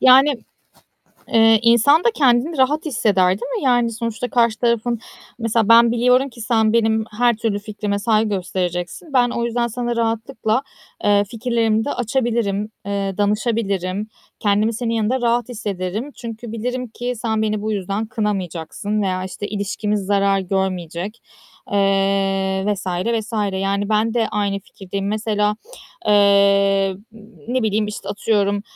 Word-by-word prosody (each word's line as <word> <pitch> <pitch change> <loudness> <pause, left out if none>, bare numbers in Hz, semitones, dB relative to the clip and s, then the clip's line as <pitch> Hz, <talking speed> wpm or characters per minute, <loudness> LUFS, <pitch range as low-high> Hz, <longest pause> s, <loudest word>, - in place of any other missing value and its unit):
Yani, 265 +3 +6 1.0
ııı, 225 0 +6
insan 235 +8 +5
da 470 - +5
kendini 275 - +2
rahat 290 +5 +2
hisseder, 205 -9 +2
değil 195 +5 -2
mi? - - -4
Yani 245 -2 +3
sonuçta 230 +2 -3
karşı 230 -2 +2
tarafın 235 -1 0 0.4
mesela 230 -2 +1
ben 230 0 +7
biliyorum 250 +3 +3
ki 240 -1 -14
sen 220 -1 +2
benim 220 -1 +2
her 240 -2 +3
türlü 220 -2 -1
fikrime 205 -1 -3
saygı 215 +1 +2
göstereceksin. 180 - -3
Ben 245 -2 +3
o 235 - -2
yüzden 235 0 0
sana 240 +1 -3
rahatlıkla, 230 +1 -1 0.4
eee, 205 0 +4
fikirlerimi 225 0 0
de 285 - -2
açabilirim, 230 -4 -1 0.2
eee, 200 -1 -2
danışabilirim. 205 -2 -1 0.3
Kendimi 210 +2 +2
senin 230 0 -2
yanında 225 +4 0
rahat 240 +1 +1
hissederim. 210 +3 -4
Çünkü 230 -1 -8
bilirim 250 +2 -3
ki 245 +3 -4
sen 220 -1 -1
beni 215 -1 -1
bu 220 - -1
yüzden 200 +2 -2
kınamayacaksın 205 -1 -3
veya 185 -1 -1
işte 190 +2 -6
ilişkimiz 205 0 -2
zarar 200 -1 +2
görmeyecek, 190 +1 -3 0.5
eee, 195 -1 +1
vs. 205 -2 -2
vs. 210 +6 -2 0.3
yani 200 +1 -1
ben 220 +1 +1
de 230 -2 +1
aynı 200 -1 -1
fikirdeyim. 195 +1 -6
Mesela, 210 -1 0 0.5
ııı, 200 -1 +4 0.5
ne 255 -1 0
bileyim, 215 0 +1
işte, 210 -2 -7
atıyorum, 205 -1 0
215 Hz, 140 wpm, -20 LUFS, 200-235 Hz, 1.0 s, ben